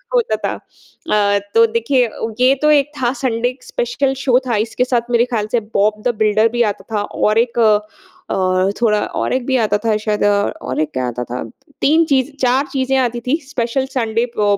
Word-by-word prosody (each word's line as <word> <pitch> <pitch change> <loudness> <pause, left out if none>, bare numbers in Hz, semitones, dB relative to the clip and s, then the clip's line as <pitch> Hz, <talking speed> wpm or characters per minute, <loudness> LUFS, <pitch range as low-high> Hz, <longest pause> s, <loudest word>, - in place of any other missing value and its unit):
होता 485 -1 +2
था। - - -1 0.8
अ, - - +2 0.2
तो 230 0 +7
देखिए 230 +3 +1
अ, 220 - -12 0.2
ये 255 +2 +5
तो 300 0 +4
एक 295 -1 +3
था 240 -1 +2
संडे 245 -2 -1
स्पेशल 480 - -1
शो 250 -2 +4
था। 235 - +1
इसके 230 +2 -1
साथ 240 -2 -1
मेरे 235 0 +3
ख्याल 225 -4 -2
से 240 - +2
बॉब 210 +1 +1
द 240 - 0
बिल्डर 215 +1 +3
भी 240 +1 -1
आता 200 - -11
था 205 - +1
और 210 +1 0
एक 235 0 0
अ, 215 -2 +5 1.0
थोड़ा 210 -3 +3
और - - -2
एक 255 -1 -1
भी 260 0 +1
आता 205 -1 +1
था 220 -1 +2
शायद 210 0 -2
अ, 205 0 +2
और - - -4
एक 155 -1 -2
क्या 130 -1 -1
आता 125 0 -4
था? 125 +1 -5 0.4
3 320 +3 +4
चीज़ 275 -2 +1
4 260 +2 +2
चीज़ें 265 0 0
आती 240 -2 0
थीं। 285 +5 +2
स्पेशल 260 -1 -1
संडे 230 -1 0
प 205 -1 +2
235 Hz, 205 wpm, -18 LUFS, 215-260 Hz, 1.0 s, तो